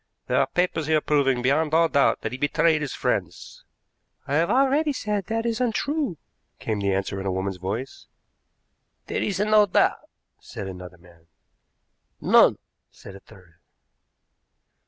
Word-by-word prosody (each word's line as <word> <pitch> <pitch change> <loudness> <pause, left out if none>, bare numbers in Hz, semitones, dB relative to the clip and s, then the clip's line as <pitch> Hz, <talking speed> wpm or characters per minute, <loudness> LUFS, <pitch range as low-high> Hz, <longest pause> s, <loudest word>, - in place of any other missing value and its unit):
There - - +1
are - - +2
papers 175 -4 -1
here 155 -1 +3
proving 135 -5 +1
beyond 150 +4 +1
all 165 0 +4
doubt 140 -3 +2
that - - -4
he 130 - -5
betrayed 155 +2 +2
his 145 - -4
friends." - - -3 0.6
"I 135 - -4
have 170 +1 +1
already 275 +3 +2
said 210 -6 -3
that 225 +1 -2
is 230 +1 -1
untrue," 250 - -1 0.4
came 110 -2 -3
the 100 -1 0
answer 95 0 -2
in 95 - -4
a - - 0
woman's 95 0 -3
voice. 105 +9 -6 1.0
"There - - -3
is 195 -3 -2
no 210 0 +4
doubt," 180 - +1 0.3
said 100 - -8
another 90 -1 -9
man. 85 -1 -21 0.9
"None," - - +5 0.3
said 100 - -13
a - - -11
third. 90 -3 -19
150 Hz, 155 wpm, -24 LUFS, -, 1.0 s, None